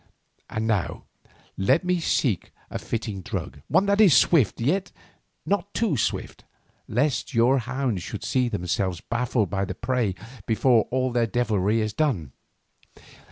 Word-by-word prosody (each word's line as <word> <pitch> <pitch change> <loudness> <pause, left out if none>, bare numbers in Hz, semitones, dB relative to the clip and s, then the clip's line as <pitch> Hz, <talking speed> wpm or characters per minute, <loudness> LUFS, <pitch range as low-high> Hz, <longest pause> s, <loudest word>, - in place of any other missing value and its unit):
"And 110 0 -2
now 110 -5 -1 0.5
let 130 - +3
me 180 0 +1
seek 120 - 0 0.2
a - - -3
fitting 110 -4 -4
drug—one 80 - -1
that 200 +1 +3
is 175 - +7
swift, 135 - +3
yet 180 +11 0 0.5
not 200 0 -1
too 225 -9 +1
swift, 110 - -2 0.4
lest 130 +2 0
your 125 +4 +4
hounds 125 -4 -2
should - - -6
see 125 -2 +1
themselves 95 -3 -1
baffled 115 -2 -1
of 95 0 0
the - - -5
prey 120 -7 -1 0.3
before 115 0 +3
all 130 0 0
their 120 -1 +1
devilry 110 -2 +1
is 110 -1 -2
done. 110 - 0
120 Hz, 140 wpm, -25 LUFS, 105-135 Hz, 0.5 s, is